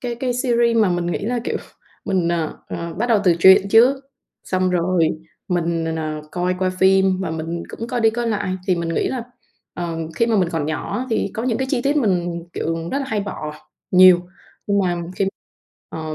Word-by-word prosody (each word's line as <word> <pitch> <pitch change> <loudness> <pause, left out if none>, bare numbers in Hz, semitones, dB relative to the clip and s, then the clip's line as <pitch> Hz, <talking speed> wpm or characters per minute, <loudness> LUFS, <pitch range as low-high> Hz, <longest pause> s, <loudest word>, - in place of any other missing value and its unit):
cái 240 -1 -3
cái 245 +1 -2
series 235 -2 +2
mà 215 -3 +4
mình 175 -1 -1
nghĩ 175 - -1
là, 235 +4 -2
kiểu, - - -1 0.5
mình, 190 -4 0
n - - +1 0.4
ờ, 170 -1 -5
bắt 225 +7 -1
đầu 220 -4 +4
từ 175 -2 +4
truyện 190 +2 +7
trước, 240 +6 +6 0.5
xong 185 -1 0
rồi 175 -2 +2 0.4
mình 170 -2 0
n 160 0 -2
n - - -3 0.3
coi 180 +1 0 0.2
phim 190 0 +4
và 185 - -2
mình 165 +1 -4
cũng 230 - -6
coi 245 - -1
đi, 225 -1 +4
coi 240 +1 -3
lại 200 -3 -1
thì 185 -3 +2
mình 170 -1 -3
nghĩ - - 0
là, 260 -2 -3 0.5
ờ, 170 -2 -4 0.2
khi 230 - +2
mà 230 -2 +2
mình 185 -4 +2
còn 160 -3 -1
nhỏ 155 +8 -3
á, 255 - -3
thì 220 - 0
có 225 - -3
những 235 -3 0
cái 265 - -1
chi 250 -4 0
tiết 280 +3 +1
mình, 175 - 0
kiểu, 165 +1 -3
rất 275 - +1
là 280 - -3
hay 215 -4 -1
bỏ 170 -6 -5 0.4
nhiều. 185 -1 +7 0.5
Nhưng 200 0 +2
mà 175 -2 -1
khi 195 - +1 0.6
ờ, 155 -1 -5
190 Hz, 215 wpm, -21 LUFS, 170-230 Hz, 0.6 s, truyện